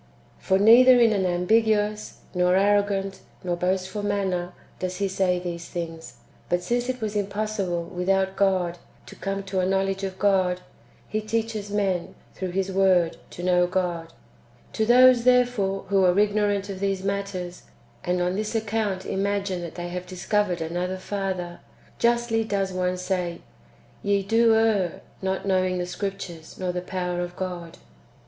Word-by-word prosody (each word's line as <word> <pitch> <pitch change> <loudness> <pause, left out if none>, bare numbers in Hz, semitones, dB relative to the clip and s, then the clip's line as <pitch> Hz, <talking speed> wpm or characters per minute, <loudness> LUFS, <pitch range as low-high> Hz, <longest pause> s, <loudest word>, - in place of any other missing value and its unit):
"^ - - -27
For 190 - +2
neither 245 +5 +7
in 230 -2 +5
an 190 -2 +1
ambiguous, 210 +3 +1
nor 180 0 +3
arrogant, 200 0 +1 0.2
nor 175 -1 -1
boastful 185 +3 -1
manner, 190 -3 -1 0.3
does 185 0 -3
He 200 0 0
say 190 -1 +1
these 175 -1 -5
things; 165 -6 -6 0.3
but 175 0 +1
since 240 +3 -1
it 255 -1 -3
was 215 -1 -3
impossible, 200 -3 -1
without 190 +2 0
God, 185 -3 +1 0.3
to - - -12
come 195 0 -3
to 195 -1 -2
a 180 - +2
knowledge 195 0 0
of 190 -1 -4
God, 185 -2 +2 0.5
He 215 - -2
teaches 220 -1 -2
men, 195 -4 -1 0.2
through 185 -1 -4
His 190 +1 -1
Word, 185 -3 +3
to 175 - -8
know 180 -1 +3
God. 175 -3 -2 0.6
To 220 - 0
those, 250 0 +7
therefore, 245 -6 +2
who 195 -1 +3
are 180 0 +4
ignorant 205 -1 +2
of 195 -2 -6
these 195 -1 -1
matters, 195 -3 -4 0.4
and 180 0 0
on 180 +1 0
this 215 +2 -3
account 215 -3 -1
imagine 195 -1 -1
that 170 -2 -7
they 175 0 -5
have 180 +1 -5
discovered 185 0 -1
another 175 +3 -2
Father, 185 -3 -4 0.4
justly 235 -1 +2
does 195 -3 -1
one 180 0 -1
say, 180 -2 -2 0.3
" - - -30
Ye 200 -1 +1
do 225 +2 +4
err, 215 -6 +1 0.2
not 190 0 -2
knowing 185 -1 +1
the 180 - -2
Scriptures, 180 -3 -6
nor 185 -1 -2
the 180 0 -3
power 180 -1 -3
of 175 0 -5
God." 175 -3 -5
190 Hz, 160 wpm, -25 LUFS, 180-205 Hz, 0.6 s, neither